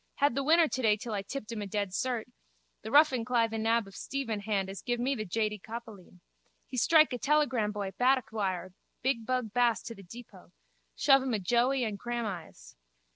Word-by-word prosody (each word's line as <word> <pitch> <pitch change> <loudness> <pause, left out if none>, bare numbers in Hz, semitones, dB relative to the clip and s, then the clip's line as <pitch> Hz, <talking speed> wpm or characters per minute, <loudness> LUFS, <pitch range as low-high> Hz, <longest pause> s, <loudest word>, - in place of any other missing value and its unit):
Had 285 -2 +2
the 275 +2 -1
winner 325 +3 +5
today 225 -7 +1
till 230 0 -6
I 200 - -1
tipped 215 +1 -6
him 225 -2 -4
a 205 - -4
dead 200 0 -2
cert. 240 +3 -2 0.6
The 220 - -7
ruffin 275 -2 +5
cly 235 -1 +2
the 225 0 -4
nab 225 0 +2
of 195 - -14
Stephen 250 -6 -3
Hand 200 -2 -1
as 195 0 -7
give 245 -1 -2
me 260 +3 +1
the 215 -5 -4
jady 210 +2 -1
coppaleen. 220 -6 -10 0.4
He - - -9
strike 310 +4 +5
a 245 - -3
telegramboy 225 -9 0
paddock 255 -1 +2
wire 185 -4 -2 0.3
big 240 -4 0
bug 250 -4 -1
Bass 245 -2 +2
to 230 - -6
the 200 - -13
depot. 195 0 -13 0.4
Shove 270 - +5
him 260 -3 -1
a - - -1
joey 245 +7 +2
and 210 -3 -3
grahamise. 220 -8 -5
230 Hz, 195 wpm, -30 LUFS, 210-255 Hz, 0.6 s, winner